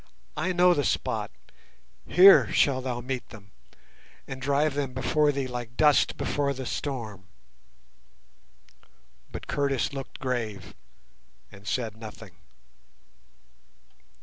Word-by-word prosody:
I 185 - -1
know 180 0 +5
the 145 - 0
spot, - - -1 0.8
here 180 - +7
shalt 130 -2 +2
thou 120 -2 -3
meet 130 0 -5
them, 100 -3 -14 0.8
and 135 -1 -7
drive 140 +2 +1
them 140 -3 -3
before 150 +3 +2
thee 140 -1 -2
like 120 -1 -7
dust 150 -2 +4
before 140 -1 -1
the 130 0 -6
storm." 115 -10 -5 2.1
But - - -7
Curtis 140 -2 -1
looked 135 -1 -7
grave 120 -6 -4 0.8
and 100 +1 -14
said 115 -4 -2
nothing. 110 -2 -10
130 Hz, 110 wpm, -27 LUFS, 120-145 Hz, 2.1 s, here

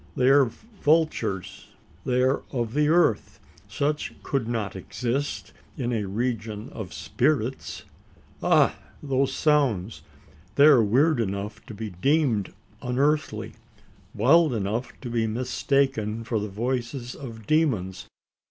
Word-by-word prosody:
They 130 +1 +3
are 140 0 +6
vultures. 155 - -1 0.4
They 125 0 +2
are 130 +2 +2
of 120 -4 -2
the 150 +1 +2
earth. 160 -9 +2 0.3
Such 150 +1 -2
could 135 -6 -1
not 110 -5 -2
exist 125 +8 -3 0.2
in 125 -3 -1
a 105 -3 -1
region 110 0 -3
of 105 -7 -7
spirits? 70 - -1 0.6
Ah! - - +3 0.2
those 135 -1 +1
sounds! 125 - +1 0.5
they 140 - +7
are 140 -7 +7
weird 135 +7 +3
enough 105 +1 -3
to 110 - -8
be 110 0 -5
deemed 115 - +1 0.3
unearthly 140 +4 0 0.6
wild 145 +4 +4
enough 110 +4 -2
to 125 - -6
be 115 -1 +1
mistaken 120 -1 0
for 115 -1 -1
the 105 0 -4
voices 120 +3 -3
of 115 -6 -9
demons. 110 - 0
125 Hz, 125 wpm, -25 LUFS, 110-140 Hz, 0.6 s, they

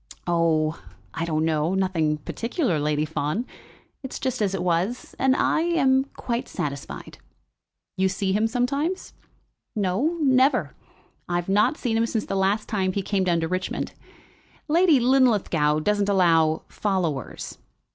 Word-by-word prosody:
"Oh, 165 -2 +1 0.3
I 165 - -2
don't 155 -1 0
know; 160 +3 +1
nothing 170 -5 +1
particular, 230 - -2
Lady 150 +1 0
Fawn. 155 - -2 0.6
It's 265 -2 -6
just 260 -4 -2
as 195 -2 +1
it 180 - -2
was, 180 +7 -1
and 265 0 +3
I 315 - +2
am 270 -6 +3
quite 240 +1 -3
satisfied." 140 - -6 0.8
"You 190 0 +2
see 195 0 -1
him 215 +2 +2
sometimes?" 280 +10 -1 0.6
"No, 210 - 0
never. 265 -1 +3 0.6
I 175 - 0
have 175 +1 -2
not 210 +10 +3
seen 230 -3 -1
him 230 +1 +2
since 225 -2 -2
the - - -3
last 195 +3 +1
time 190 -4 0
he 200 - -2
came 195 -1 0
down 170 -2 +2
to 165 - -1
Richmond. 185 +2 -3 0.7
Lady 325 -2 +4
Linlithgow 210 - +3
doesn't 205 +3 +1
allow 165 -5 +3
followers." 180 -9 -3
195 Hz, 145 wpm, -24 LUFS, 165-245 Hz, 0.8 s, Lady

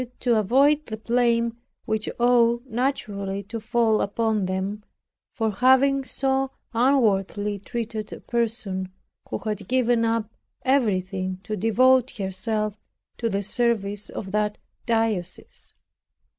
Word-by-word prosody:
To 240 -2 +3
avoid 280 +8 +3
the 220 - -5
blame 235 0 +1 0.3
which 215 0 -1
ought 240 0 +3
naturally 210 -6 -2
to 225 +4 -6
fall 220 0 +2
upon 215 -1 0
them 190 +3 -3 0.5
for 225 -3 -1
having 265 +5 +4
so 270 0 0 0.2
unworthily 210 -5 +2
treated 220 0 -5
a - - -7
person 215 -6 -2 0.4
who - - -2
have 210 -3 -4
given 245 -2 +2
up 225 -1 0 0.4
everything 190 -8 0
to 215 - -3
devote 250 +5 +3
herself 210 +2 -2 0.4
to 230 - 0
the 200 -1 -1
service 210 -2 0
of 190 - -6
that 210 0 0 0.3
diocese. 225 -6 -2
225 Hz, 115 wpm, -24 LUFS, 205-240 Hz, 0.5 s, having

